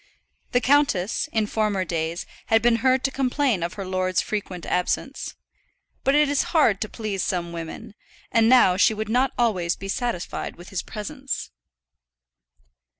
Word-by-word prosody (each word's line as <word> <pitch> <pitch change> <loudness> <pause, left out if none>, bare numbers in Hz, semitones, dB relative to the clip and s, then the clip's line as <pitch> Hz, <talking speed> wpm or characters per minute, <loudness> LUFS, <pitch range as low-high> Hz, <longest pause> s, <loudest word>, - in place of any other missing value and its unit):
The 245 - +2
countess, 255 -9 +2
in 220 -1 +1
former 210 -3 0
days, 165 0 -2 0.2
had 225 -1 +3
been 235 -1 +4
heard 260 +2 +2
to 270 - +1
complain 265 - +1
of 170 +1 -3
her 195 - -5
lord's 185 -1 0
frequent 195 -5 -3
absence. 180 +9 -2 0.7
But 275 - +3
it 300 0 +5
is 285 0 +2 0.2
hard 220 -11 +4
to 215 - -2
please 210 -4 -3
some 175 -2 -2
women, 165 +3 -7 0.4
and 225 -1 +4
now 240 -8 +6
she 215 +2 +4
would 215 0 -4
not 250 +3 +2
always 185 -8 +1
be 195 - -8
satisfied 235 -4 -3
with 175 +1 -12
his 195 - -2
presence. 265 +6 -5
215 Hz, 155 wpm, -24 LUFS, 185-250 Hz, 0.7 s, now